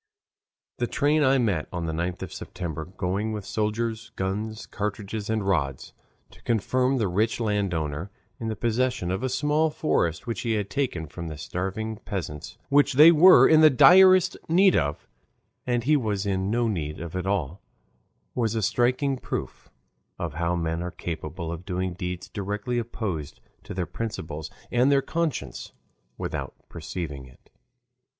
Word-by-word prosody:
The 120 - 0
train 150 +4 +2
I 135 0 +4
met 100 -11 0
on 85 -2 -3
the 80 - -2
9th 85 +3 -3
of 95 - -7
September 80 -3 -5
going 95 +4 -2
with 105 -2 -5
soldiers, 110 +1 -2
guns, 105 +3 -3
cartridges, 105 0 -4
and 110 -3 0
rods, 70 -9 -1 0.4
to - - -18
confirm 130 +4 +1
the 110 -5 +1
rich 105 +7 0
landowner 90 -7 -1 0.3
in 115 - -4
the 110 - -2
possession 120 -3 0
of 95 - -2
a 130 - -1
small 150 +5 +1
forest 85 - 0
which 115 - -3
he 115 -2 0
had 105 -2 -2
taken 110 - -1
from 85 +3 -7
the 75 -2 -6
starving 95 +8 -4
peasants, 90 -4 -6
which 145 0 +4
they 150 +5 +9
were 175 +4 +8
in 155 -1 +6
the 155 - +9
direst 185 +5 +7
need 185 +2 +5
of, 75 -2 -1 0.6
and 120 -1 +1
he 150 +5 +4
was 105 -7 -1
in 95 -1 0
no 120 +2 +1
need 80 -7 -3
of 85 +1 -7
at 90 +1 -2
all, 95 -2 -1 0.7
was 115 -2 0
a 110 - 0
striking 130 +6 +1
proof - - -5 0.5
of 85 -4 -4
how 85 +2 0
men 80 -1 -2
are 90 - -3
capable 80 0 -5
of 85 +1 -6
doing 90 0 -2
deeds 90 0 -5
directly 105 +4 -3
opposed 95 -10 -4 0.2
to - - -8
their 90 -2 -1
principles 80 -10 -5 0.2
and 125 +3 +3
their 135 -1 +3
conscience 145 - -3 0.4
without - - -4
perceiving 80 -4 -6
it. 65 - -21
105 Hz, 160 wpm, -26 LUFS, 85-120 Hz, 0.7 s, they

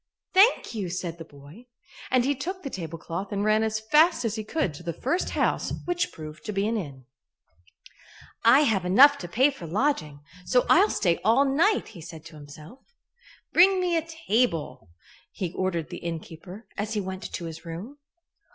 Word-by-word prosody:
"Thank 400 - +4
you!" 200 -5 -3
said 170 -1 -5
the - - -6
boy, 145 - -15 0.4
and 255 -1 +2
he 280 - +2
took 365 +8 -6
the 275 - -5
tablecloth 170 +2 -6
and 200 0 -1
ran 215 0 +3
as 220 0 -1
fast 300 +4 +3
as 220 - -1
he 220 -1 -4
could 215 - -2
to 145 - -11
the 170 -1 -4
first 335 +8 -1
house, - - 0
which 350 0 -1
proved 155 -1 -10
to - - -3
be 200 0 0
an 230 - -1
inn. 140 - -6 1.4
"I 255 +5 +7
have 220 -10 +1
enough 265 +11 +6
to 175 - -6
pay 260 +11 +3
for 180 -11 -9
lodging, 165 - -1 0.2
so 250 +6 +2
I'll 395 +5 +6
stay 170 -3 +1
all 230 +7 +4
night," 330 +11 +2
he 185 -7 -12
said 160 -1 -11
to 165 -1 -12
himself. 150 - -13 0.7
"Bring 375 +2 +6
me 355 -2 0
a 330 - +2
table," 245 - -2 0.4
he 180 -3 -4
ordered 180 -4 -2
the 175 - -5
innkeeper, 170 +5 -8
as 210 +2 -2
he - - +1
went 190 -1 -6
to 170 - -5
his 165 0 -8
room. 185 - -8
210 Hz, 185 wpm, -26 LUFS, 170-275 Hz, 1.4 s, I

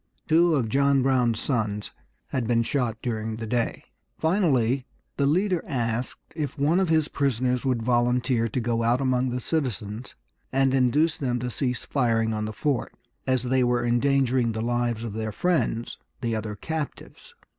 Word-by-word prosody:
Two 165 +1 +4
of 125 -6 +1
John 140 +2 +3
Brown's 125 -4 +2
sons 105 -5 -1 0.4
had 125 -4 -1
been 115 0 +3
shot 120 -3 -1
during 110 -2 -2
the 115 +1 -5
day. 115 +1 -1 0.3
Finally 140 - +2 0.3
the 140 - +2
leader 180 +3 +2
asked 120 -3 -3
if 150 -2 -3
one 150 +6 +3
of 190 -3 +1
his 160 -2 +3
prisoners 125 -3 0
would 125 -4 +1
volunteer 120 0 +2
to 115 - -2
go 115 -1 0
out 120 +2 +2
among 130 -1 +1
the 125 +1 -2
citizens 120 - -3 0.4
and 135 0 +2
induce 145 +5 +3
them 125 -3 -1
to 125 +1 -3
cease 125 0 -2
firing 115 -4 +1
on 105 0 -2
the 110 - -4
fort, 135 +2 -2 0.3
as 130 -2 +2
they 130 0 +2
were 120 0 +1
endangering 125 -1 +2
the 110 - -3
lives 120 -1 0
of 115 -3 -4
their 110 0 -3
friends, 120 - -1 0.2
the 115 -2 -1
other 105 -1 -4
captives. 155 +7 -6
125 Hz, 165 wpm, -26 LUFS, 115-140 Hz, 0.4 s, Two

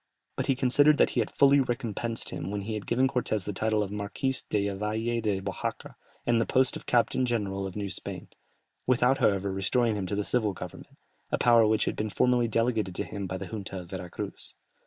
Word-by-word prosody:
But - - -2
he 135 - +3
considered 145 +3 +4
that - - +4
he - - 0
had 110 - 0
fully 140 0 +5
recompensed 115 -2 -2
him 90 - -4
when 100 0 -3
he 110 +3 -4
had 105 -1 -5
given 130 +3 +3
Cortès 120 -7 -1
the 105 - -3
title 110 +1 +1
of 100 - -6
Marquis 105 +6 -2 0.2
della 100 -1 0
Valle 110 +3 -1
de 105 -3 0
Oajaca, 95 0 -4 0.3
and 120 -1 +3
the - - -1
post 130 0 +2
of - - -9
captain 120 +1 +2
general 100 -5 -1
of 95 - -9
New 105 -1 -3
Spain, 95 - -6 0.6
without, 130 +1 +3
however, 100 -1 +2
restoring 110 +5 +1
to 105 - -2
him 95 - -2
the 105 - 0
civil 110 -2 0
government, 90 -1 -9 0.3
a - - +1
power 115 -2 +5
which 110 0 +2
had - - -1
been 110 0 -2
formerly 125 +2 +2
delegated 115 -4 0
to - - -1
him 100 -2 -5
by 95 +1 -3
the - - -6
junta 100 -3 -6
of 85 - -14
Vera 90 -2 -5
Cruz. - - -7
110 Hz, 220 wpm, -28 LUFS, 100-120 Hz, 0.6 s, fully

